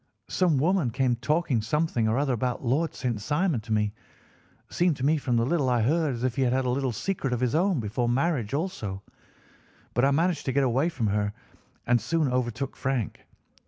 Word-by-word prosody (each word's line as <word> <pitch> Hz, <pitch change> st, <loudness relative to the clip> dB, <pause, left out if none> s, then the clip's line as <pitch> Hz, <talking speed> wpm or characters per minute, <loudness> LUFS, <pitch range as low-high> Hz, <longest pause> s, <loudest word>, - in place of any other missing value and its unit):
Some 175 Hz, -6 st, +2 dB
woman 165 Hz, -1 st, +2 dB
came 125 Hz, +1 st, +1 dB
talking 150 Hz, -1 st, +1 dB
something 120 Hz, -1 st, 0 dB
or 110 Hz, -, +1 dB
other 140 Hz, -2 st, +1 dB
about 125 Hz, +2 st, -2 dB
Lord 150 Hz, +7 st, 0 dB
St. 120 Hz, -5 st, -2 dB
Simon 150 Hz, -, 0 dB
to 110 Hz, +1 st, -9 dB
me—seemed 110 Hz, -, -3 dB
to 130 Hz, -, -2 dB
me 155 Hz, +2 st, +3 dB
from 125 Hz, -4 st, 0 dB
the 115 Hz, -, +2 dB
little 145 Hz, -2 st, +1 dB
I 120 Hz, -3 st, +2 dB
heard 150 Hz, +1 st, +1 dB
as 120 Hz, -, -6 dB
if 130 Hz, -2 st, 0 dB
he -, -, +1 dB
had 130 Hz, +1 st, +2 dB
a -, -, 0 dB
little 130 Hz, 0 st, 0 dB
secret 135 Hz, -, -2 dB
of 120 Hz, -, -1 dB
his 125 Hz, 0 st, 0 dB
own 175 Hz, 0 st, +2 dB
before 115 Hz, +2 st, -1 dB
marriage 130 Hz, -3 st, 0 dB
also—but 115 Hz, -, -4 dB, 1.0 s
I 135 Hz, -, +5 dB
managed 165 Hz, +3 st, +1 dB
to 130 Hz, -, -1 dB
get 140 Hz, +1 st, +3 dB
away 135 Hz, +6 st, +2 dB
from 130 Hz, -9 st, -3 dB
her 105 Hz, 0 st, 0 dB, 0.5 s
and 120 Hz, -1 st, +3 dB
soon 150 Hz, +2 st, 0 dB
overtook 125 Hz, +1 st, -2 dB
Frank. 135 Hz, -5 st, -3 dB
130 Hz, 195 wpm, -27 LUFS, 120-155 Hz, 1.0 s, I